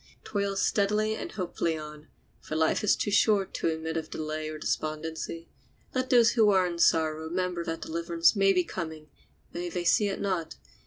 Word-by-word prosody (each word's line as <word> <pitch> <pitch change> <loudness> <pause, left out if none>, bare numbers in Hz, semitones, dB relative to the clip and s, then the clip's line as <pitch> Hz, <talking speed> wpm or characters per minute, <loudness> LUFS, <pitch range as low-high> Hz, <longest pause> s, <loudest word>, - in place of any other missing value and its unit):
Toil 200 -1 -2
steadily 210 +2 +1
and - - -6
hopefully 170 -4 -2
on, 150 0 -9 0.3
for 155 - -6
life 160 +4 +1
is 210 - +4
too 205 - -2
short 200 -1 +3
to - - -1
admit 160 0 -2
of 160 -1 -4
delay 155 0 -4
or 155 - -6
despondency. 160 +2 -3 0.5
Let 255 0 -1
those 235 -2 +6
who 220 -3 +4
are 190 -2 +4
in 170 -1 -4
sorrow 160 -1 +2
remember 180 +1 -2
that 165 0 -4
deliverance 170 +3 +1
may 195 -1 +4
be 180 -2 +2
coming, 160 -4 -7 0.4
though 175 0 -4
they 175 +1 -3
see 205 +4 +3
it 195 - -3
not. 185 -5 -2
170 Hz, 180 wpm, -28 LUFS, 160-200 Hz, 0.5 s, those